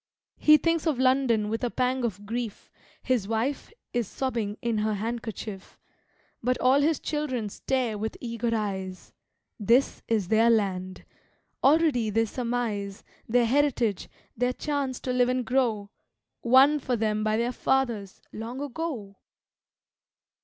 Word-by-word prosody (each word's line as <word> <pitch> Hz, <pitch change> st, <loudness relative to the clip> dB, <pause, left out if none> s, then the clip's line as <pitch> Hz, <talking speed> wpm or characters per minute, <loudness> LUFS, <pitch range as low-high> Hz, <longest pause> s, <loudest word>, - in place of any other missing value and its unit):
He 305 Hz, 0 st, +7 dB
thinks 330 Hz, +1 st, 0 dB
of 300 Hz, -5 st, +1 dB
London 255 Hz, -4 st, +2 dB
with 225 Hz, +3 st, -3 dB
a 245 Hz, -, +1 dB
pang 255 Hz, +1 st, 0 dB
of 205 Hz, -3 st, -3 dB
grief; 230 Hz, 0 st, -5 dB, 0.3 s
His 245 Hz, -6 st, 0 dB
wife 230 Hz, -, -2 dB, 0.2 s
is 240 Hz, -4 st, 0 dB
sobbing 230 Hz, -5 st, -3 dB
in 230 Hz, -2 st, -1 dB
her 215 Hz, 0 st, 0 dB
handkerchief. 220 Hz, -2 st, -5 dB, 0.6 s
But 250 Hz, +2 st, +1 dB
all 265 Hz, +3 st, +4 dB
his 310 Hz, +1 st, +2 dB
children 260 Hz, -8 st, -2 dB
stare 240 Hz, -1 st, -1 dB
with 220 Hz, +1 st, -4 dB
eager 235 Hz, -1 st, -3 dB
eyes. 190 Hz, -4 st, -3 dB, 0.5 s
This 235 Hz, +6 st, +2 dB
is 210 Hz, -5 st, 0 dB
their 225 Hz, +1 st, +4 dB
land. 185 Hz, -4 st, 0 dB, 0.6 s
Already 280 Hz, -6 st, +4 dB
they 225 Hz, +2 st, +2 dB
surmise 225 Hz, -4 st, -3 dB, 0.3 s
Their 240 Hz, +1 st, +4 dB
heritage, 245 Hz, -6 st, +1 dB, 0.3 s
their 250 Hz, +2 st, 0 dB
chance 280 Hz, -3 st, -2 dB
to 255 Hz, -, -2 dB
live 250 Hz, 0 st, +3 dB
and 255 Hz, -1 st, 0 dB
grow, 225 Hz, -5 st, 0 dB, 0.5 s
Won 265 Hz, +5 st, +6 dB
for 255 Hz, -2 st, -1 dB
them 215 Hz, -1 st, 0 dB
by 215 Hz, 0 st, +1 dB
their 235 Hz, +2 st, 0 dB
fathers, 235 Hz, -7 st, -1 dB
long 230 Hz, +4 st, -6 dB
ago! 275 Hz, -8 st, -5 dB
235 Hz, 140 wpm, -27 LUFS, 215-260 Hz, 0.6 s, He